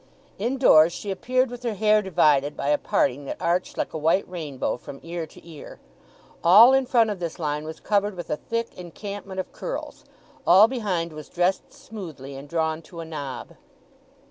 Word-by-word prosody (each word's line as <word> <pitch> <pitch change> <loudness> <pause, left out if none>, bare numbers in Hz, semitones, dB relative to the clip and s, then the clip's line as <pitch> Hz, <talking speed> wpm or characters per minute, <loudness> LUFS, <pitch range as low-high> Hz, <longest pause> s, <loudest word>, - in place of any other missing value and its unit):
Indoors 220 -9 +5
she 200 - -5
appeared 255 +6 0
with 245 0 -8
her 235 -3 -2
hair 215 +1 +3
divided 150 -6 +2
by 140 - -2
a 150 - +3
parting 140 +3 0
that - - -6
arched 175 +2 -1
like - - -2
a 160 - -3
white 165 +6 +2
rainbow 155 -7 -3
from 135 +2 -10
ear 165 -1 -5
to 160 - -17
ear. 155 -3 -11 0.6
All 215 +9 +8
in 265 -1 +2
front 230 -4 +3
of 200 - -5
this 170 -2 -4
line 150 -2 -2
was 160 0 -7
covered 205 -1 0
with 175 - -7
a - - +2
thick 230 +5 -4
encampment 190 +2 -7
of 185 - -5
curls; - - -6 0.4
all 190 +5 +8
behind 190 -10 -2
was 155 -1 -10
dressed 180 +2 0
smoothly, 160 -11 -9
and 140 +2 -10
drawn 160 -1 -1
to 170 +1 -12
a 165 - -5
knob. 145 -5 -6
175 Hz, 185 wpm, -24 LUFS, 155-210 Hz, 0.6 s, All